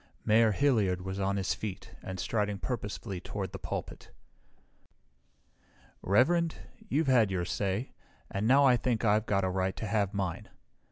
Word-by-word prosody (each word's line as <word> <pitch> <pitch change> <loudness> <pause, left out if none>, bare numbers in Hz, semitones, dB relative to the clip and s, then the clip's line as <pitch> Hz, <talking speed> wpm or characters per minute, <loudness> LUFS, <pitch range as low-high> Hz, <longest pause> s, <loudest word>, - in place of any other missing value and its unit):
Mayor 110 +1 +5
Hilliard 105 -8 +2
was 95 +1 -4
on 100 0 0
his 95 -1 0
feet 100 -2 -6
and 95 -1 -6
striding 105 +1 -1
purposefully 105 -4 -4
toward - - -5
the - - -7
pulpit. - - -6 1.9
"Reverend, 160 - +3 0.3
you've 160 +3 +1
had 125 -6 +4
your 90 -2 -1
say, 100 +6 -2 0.4
and 100 +3 -1
now 140 +3 +6
I 125 -2 +5
think 115 -1 -1
I've 105 +1 +2
got 100 -1 +1
a 95 - +1
right 95 0 -1
to - - -5
have 100 -2 0
mine. 95 -4 -3
105 Hz, 155 wpm, -30 LUFS, 95-120 Hz, 1.9 s, now